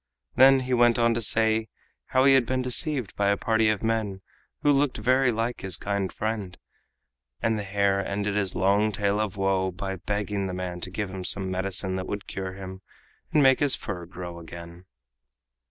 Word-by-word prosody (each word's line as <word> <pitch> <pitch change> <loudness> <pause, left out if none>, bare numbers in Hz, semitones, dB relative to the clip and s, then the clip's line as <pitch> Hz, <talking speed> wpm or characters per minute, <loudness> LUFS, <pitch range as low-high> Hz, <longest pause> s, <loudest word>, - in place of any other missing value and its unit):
Then 135 +1 +6
he 130 0 -2
went 120 -1 +4
on 115 0 +3
to 115 - -2
say 110 +1 +2 0.4
how 130 +1 +3
he 135 - +7
had 130 -3 +3
been 130 0 -1
deceived 125 - 0
by 100 0 +1
a 100 - +2
party 110 -1 +2
of 105 -1 -1
men 110 -4 -1 0.4
who 145 - +5
looked 140 -1 +1
very 130 +3 +2
like 115 +2 -2
his 95 -3 +1
kind 100 -2 -2
friend: 110 -4 -4 0.8
and 115 0 +1
the 105 - -3
hare 100 0 +1
ended 100 +1 -2
his 100 -3 0
long 100 +4 +2
tale 100 0 0
of 105 -3 -2
woe 95 -1 +1
by 95 +1 -5
begging 100 +1 -2
the 90 - -4
man 90 -1 -5
to 95 - -4
give 100 +1 -4
him 95 -1 -6
some 95 +1 0
medicine 95 0 0
that 95 - -5
would 100 -1 -5
cure 95 -1 -5
him 95 0 -9 0.5
and 150 - +4
make 130 -1 +5
his 145 -2 +3
fur 90 -3 -6
grow 85 -1 -8
again. 85 +1 -11
100 Hz, 195 wpm, -26 LUFS, 95-115 Hz, 0.8 s, he